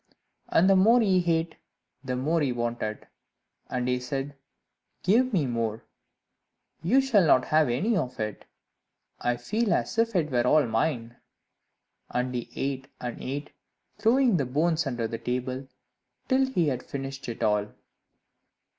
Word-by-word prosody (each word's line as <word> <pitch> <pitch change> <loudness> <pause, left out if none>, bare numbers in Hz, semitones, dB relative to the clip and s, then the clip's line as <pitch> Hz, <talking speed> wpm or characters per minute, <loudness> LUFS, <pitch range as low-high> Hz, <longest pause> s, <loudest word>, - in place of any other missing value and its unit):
And 175 - +4
the 195 - +6
more 220 +6 +6
he 190 -5 +3
ate, 165 0 -1 0.5
the 130 -1 -2
more 155 +6 +1
he 140 -3 +1
wanted; 120 -3 -3 0.6
and 125 -1 -2
he 125 0 +1
said, 135 +3 -4 0.7
"Give 245 +7 +3
me 175 -9 +1
more, 115 -3 -2 1.0
you 235 - +4
shall 240 -8 +3
not 130 -5 +4
have 155 -3 +3
any 195 - +1
of 130 -8 -2
it; 105 -1 -4 0.7
I 120 0 0
feel 215 - -1
as 225 - -2
if 230 -1 +1
it 155 -4 +1
were 120 -1 +2
all 155 -1 +5
mine." 120 0 -1 0.9
And 125 +1 -1
he 120 -1 -4
ate 135 -1 -3
and 120 -1 -5
ate, 145 +3 -5 0.5
throwing 235 -2 +4
the 140 - 0
bones 160 +4 +1
under 120 -3 -2
the 115 +1 -5
table, 130 +2 -3 0.6
till 265 0 +3
he 175 - +1
had 130 -2 -2
finished 135 -1 -6
it 115 0 -5
all. 105 -1 +2
135 Hz, 150 wpm, -27 LUFS, 125-180 Hz, 1.0 s, the